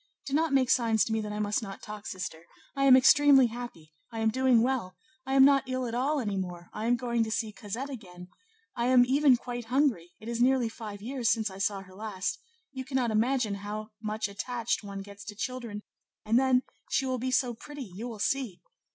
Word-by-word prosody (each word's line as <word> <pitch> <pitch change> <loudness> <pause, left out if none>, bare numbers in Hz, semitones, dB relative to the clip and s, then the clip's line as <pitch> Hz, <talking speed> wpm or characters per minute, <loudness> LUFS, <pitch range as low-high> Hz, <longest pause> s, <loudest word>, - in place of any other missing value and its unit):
Do 275 - -5
not 320 +1 +2
make 260 -2 +3
signs 225 -4 +3
to 220 - -2
me 220 - 0
that 210 -1 -5
I 210 - -4
must 210 +1 0
not 195 -3 -8
talk, 210 -1 -8
sister! 170 -3 -6 0.3
I 275 0 +1
am 260 -1 +9
extremely 275 0 +6
happy; 230 -10 -7 0.2
I 225 - -7
am 220 0 +2
doing 255 -1 +4
well; 240 -8 -1 0.3
I 270 - 0
am 270 0 +8
not 275 -2 +4
ill 255 0 -1
at 230 - -4
all 275 +5 +1
any 205 -6 -2
more; 175 -2 -6
I 215 +2 -3
am 245 - +4
going 235 -2 0
to 220 - -4
see 220 0 -1
Cosette 225 +7 -6
again; 180 -7 -10 0.5
I 235 0 0
am 250 -1 +6
even 270 0 +4
quite 245 -1 -6
hungry; 235 - +1
it 220 - -11
is 235 0 -2
nearly 255 -2 +3
five 210 -3 -8
years 245 -1 -1
since 220 -3 +1
I 190 - -10
saw 200 0 0
her 185 -1 -15
last; 200 -1 -4 0.3
you 260 -1 -5
cannot 260 -3 -1
imagine 230 0 +1
how 215 +1 -6
much 215 -1 -2
attached 230 +3 -2
one 200 -1 -6
gets 200 0 -12
to 215 -2 -7
children, 230 -2 -5 0.4
and 225 +3 +4
then, 260 -1 +3 0.3
she 270 - +1
will 255 -1 -1
be 255 +2 -2
so 255 -1 +1
pretty; 290 +4 -9
you 210 +2 -7
will 230 -3 -7
see! 225 -4 -1
230 Hz, 220 wpm, -29 LUFS, 210-260 Hz, 0.5 s, am